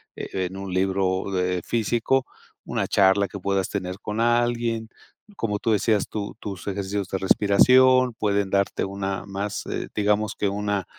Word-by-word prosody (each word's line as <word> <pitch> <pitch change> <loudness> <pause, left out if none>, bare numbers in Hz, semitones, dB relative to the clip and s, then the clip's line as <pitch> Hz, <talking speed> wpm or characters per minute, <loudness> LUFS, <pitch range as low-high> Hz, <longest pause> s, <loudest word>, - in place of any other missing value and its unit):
e 95 -1 -3
en 90 +1 -6
un 95 -1 -6
libro, 95 0 0
eh, 90 0 0
físico, 120 +3 +1 0.4
una - - -1
charla 100 +1 +4
que 100 - -8
puedas 95 0 0
tener 90 +1 -4
con 105 +1 -4
alguien, 120 -1 +1 0.5
como 105 - -2
tú 115 - 0
decías 105 0 +1
tu 105 -2 -5
tus 100 -6 -7
ejercicios 100 0 -3
de 95 - -1
respiración 125 +6 +5
pueden 100 -3 0
darte 100 0 +1
una 95 -1 -4
más, 100 +1 -4
eh, - - -4
digamos 105 0 +1
que 105 - 0
una 100 -1 -2
100 Hz, 160 wpm, -24 LUFS, 95-110 Hz, 0.5 s, respiración